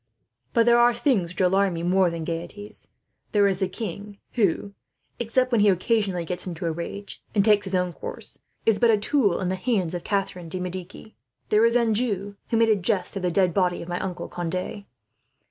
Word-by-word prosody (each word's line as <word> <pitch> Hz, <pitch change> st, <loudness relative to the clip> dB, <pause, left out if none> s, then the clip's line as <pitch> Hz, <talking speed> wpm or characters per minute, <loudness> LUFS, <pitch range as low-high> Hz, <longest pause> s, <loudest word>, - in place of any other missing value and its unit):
But 230 Hz, -2 st, +4 dB
there 240 Hz, 0 st, +5 dB
are 240 Hz, 0 st, +5 dB
things 235 Hz, -8 st, +1 dB
which 180 Hz, -, -4 dB
alarm 190 Hz, 0 st, +3 dB
me, 165 Hz, -, -4 dB
more 185 Hz, +1 st, +3 dB
than 170 Hz, -1 st, -5 dB
gaieties. 170 Hz, +5 st, -6 dB, 0.5 s
There 205 Hz, -1 st, +5 dB
is 190 Hz, -2 st, 0 dB
the 190 Hz, -, +1 dB
king 205 Hz, 0 st, -6 dB, 0.2 s
who, 200 Hz, -2 st, 0 dB, 0.5 s
except 255 Hz, +2 st, +1 dB
when 230 Hz, -3 st, +3 dB
he 205 Hz, -, +6 dB
occasionally 190 Hz, -2 st, +1 dB
gets 180 Hz, +3 st, -4 dB
into 175 Hz, 0 st, -5 dB
a 165 Hz, -, +1 dB
rage, 170 Hz, +5 st, -7 dB
and 200 Hz, -1 st, +4 dB
takes 210 Hz, -2 st, +4 dB
his 190 Hz, 0 st, -1 dB
own 180 Hz, -1 st, 0 dB
course, -, -, -8 dB, 0.3 s
is 220 Hz, -2 st, +3 dB
but 235 Hz, -, +4 dB
a 220 Hz, -, +5 dB
tool 210 Hz, -3 st, +2 dB
in 185 Hz, -, -1 dB
the 185 Hz, -, 0 dB
hands 185 Hz, -4 st, -1 dB
of 175 Hz, -, -4 dB
Catharine 190 Hz, -4 st, -2 dB
de 185 Hz, -, -4 dB
Medici. 180 Hz, +4 st, -7 dB, 0.3 s
There 215 Hz, +2 st, +5 dB
is 230 Hz, -, 0 dB
Anjou, 215 Hz, -4 st, +1 dB
who 230 Hz, -, +1 dB
made 225 Hz, 0 st, +4 dB
a 215 Hz, -, +5 dB
jest 190 Hz, -1 st, -1 dB
of 195 Hz, -, -3 dB
the 180 Hz, -, +1 dB
dead 180 Hz, 0 st, +2 dB
body 180 Hz, -2 st, +1 dB
of -, -, -11 dB
my 175 Hz, +1 st, -2 dB
uncle 185 Hz, -2 st, -4 dB
Conde. 180 Hz, +4 st, -4 dB
195 Hz, 210 wpm, -25 LUFS, 180-215 Hz, 0.5 s, he